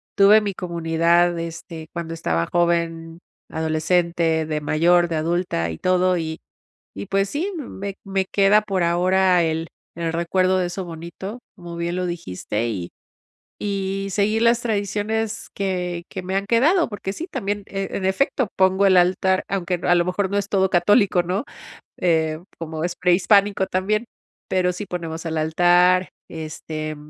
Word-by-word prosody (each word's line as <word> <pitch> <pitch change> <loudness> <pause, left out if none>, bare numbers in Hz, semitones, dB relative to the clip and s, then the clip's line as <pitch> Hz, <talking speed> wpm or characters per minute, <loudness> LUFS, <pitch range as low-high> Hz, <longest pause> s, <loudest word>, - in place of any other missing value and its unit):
Tuve 205 +2 +7
mi 205 -2 -2
comunidad, 170 0 +1
este, 165 -1 -7
cuando 170 -1 -5
estaba 85 - -1
joven, 170 -1 0 0.3
adolescente, 160 0 +1
de 155 -1 -2
mayor, 170 +4 +3
de 165 - -1
adulta 165 - -1
y 80 - -5
todo, 185 - +2
y 160 -1 -4 0.6
y 100 - -6
pues 195 0 0
sí, 335 +8 -2
me 200 - -6
me 195 -1 -1
queda 200 +2 +4
por 195 -3 -1
ahora 180 +1 +3
el 160 0 -1 0.3
el 165 -1 -3
recuerdo 185 +3 +1
de 180 - +1
eso 180 +2 -5
bonito, 170 +6 -7 0.2
como 175 -3 -9
bien 170 +1 -2
lo 185 - -1
dijiste, 120 - -3
y 90 -6 -4 0.7
y 195 -1 -2
seguir 210 +3 +1
las 235 0 +4
tradiciones 215 0 -2
que 180 -3 -2
que 190 - -5
me 190 +1 -3
han 200 - -1
quedado 300 - +3
porque 205 -3 -5
sí, 320 - -6
también, 205 - -3
en 195 -1 -4
efecto, 240 +5 +1
pongo 190 +1 +3
el 190 -1 +5
altar, 185 +1 +3
aunque, 185 -2 -1
a 175 - +4
lo 175 0 +2
mejor, 185 +2 -1
no 200 - -1
es 200 -1 -1
todo 190 -2 +2
católico, 185 +1 +3
¿no?, 185 +5 -2 0.6
eh, 160 -3 +1 0.2
como 160 -1 -5
es 175 +1 -2
prehispánico 190 +2 +3
también, 210 +5 0 0.4
pero 180 -1 +1
sí, 200 +3 -6
ponemos 165 -3 -5
el 160 -1 -2
altar, 175 +3 +4 0.2
este, 155 -1 -6
180 Hz, 155 wpm, -22 LUFS, 165-195 Hz, 0.7 s, Tuve